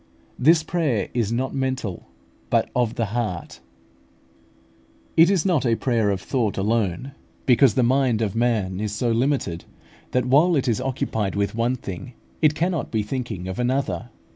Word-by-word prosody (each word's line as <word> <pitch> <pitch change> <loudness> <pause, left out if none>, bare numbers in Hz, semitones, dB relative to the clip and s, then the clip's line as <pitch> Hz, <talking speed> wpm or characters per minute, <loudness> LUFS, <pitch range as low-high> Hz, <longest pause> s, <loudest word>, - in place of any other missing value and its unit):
This 155 +5 +5
prayer 150 - -1
is 115 -3 0
not 130 +3 -1
mental, 130 -8 -3 0.4
but - - +1
of 120 -3 +1
the 115 -2 -2
heart. 110 -8 -3 1.6
It 165 +2 +7
is 195 -3 +2
not 175 -8 +2
a 115 -3 +2
prayer 115 -4 +1
of 100 -2 0
thought 115 -4 -1
alone, 105 +3 0 0.3
because 125 -2 +5
the 130 - +3
mind 125 -2 +2
of 105 -2 -2
man 110 -6 0
is 105 0 -2
so 120 +1 0
limited, 115 - 0 0.4
that 125 -1 0
while 150 +7 +4
it 135 -2 0
is 120 +1 +1
occupied 115 -6 -2
with 100 0 0
one 115 +3 0
thing 115 +2 -8 0.3
it 155 -1 +4
cannot 170 -1 -1
be 110 -2 0
thinking 105 -5 -4
of 95 +3 -5
another. 125 -8 -1
120 Hz, 165 wpm, -23 LUFS, 105-135 Hz, 1.6 s, It